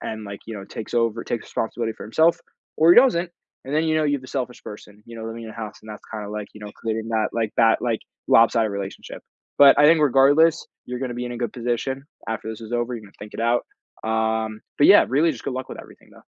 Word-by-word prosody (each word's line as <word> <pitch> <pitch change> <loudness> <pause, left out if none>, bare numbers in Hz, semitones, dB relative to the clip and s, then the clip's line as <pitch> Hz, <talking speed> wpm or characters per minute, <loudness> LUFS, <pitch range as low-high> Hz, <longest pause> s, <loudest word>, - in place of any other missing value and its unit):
and, 110 -1 -6
like, 100 0 -8
you 115 - -6
know, 100 -1 -7
takes 110 - -8
over 115 -1 0
takes 115 - -3
responsibility 115 0 -3
for - - -9
himself 160 +9 +3 0.4
or 160 +2 +6
he - - +4
doesn't, 180 -9 +3 0.3
and 140 +3 -4
then, 160 +1 +2
you 155 0 +1
know, 155 - +2
you 145 -1 +1
have 140 - -2
the 130 - -12
selfish 125 -2 -4
person, 105 0 -11
you 115 0 -10
know, 110 - -7
living 115 +1 -6
in 110 - -8
your - - -10
house, 110 -2 -7
and 110 - -14
that's 105 - -9
kinda, 105 -2 -5
like, 105 -1 -5
you 105 - -12
know, 105 -1 -8
creating 110 0 -3
that 110 -1 0
like 115 -2 -2
that, 115 0 +4
like, 115 -3 -1 0.3
lopsided 115 -1 +4
relationship. 100 0 -7 0.4
But 140 -1 +8
I 145 - +6
think 165 0 +5
regardless, 145 +4 +4 0.2
you're 125 0 -5
gonna 130 -2 -3
be 125 +1 -4
in 120 - -5
a 120 - -6
good 120 -3 -3
position. 125 +3 -2 0.3
After 110 0 -4
this 110 0 -8
is 115 +1 -9
over, 120 +1 -1
you're 115 - -6
gonna 100 - -16
think 105 0 -10
it - - -5
out, 120 +1 +1 0.4
um, 110 -1 -1 0.2
but, 145 - +6
yeah, 205 - +7
really, 155 +5 +3
just - - -10
good 135 - -3
luck 130 0 -5
with - - -7
everything, - - -18
though. - - -17
115 Hz, 260 wpm, -23 LUFS, 110-135 Hz, 0.4 s, But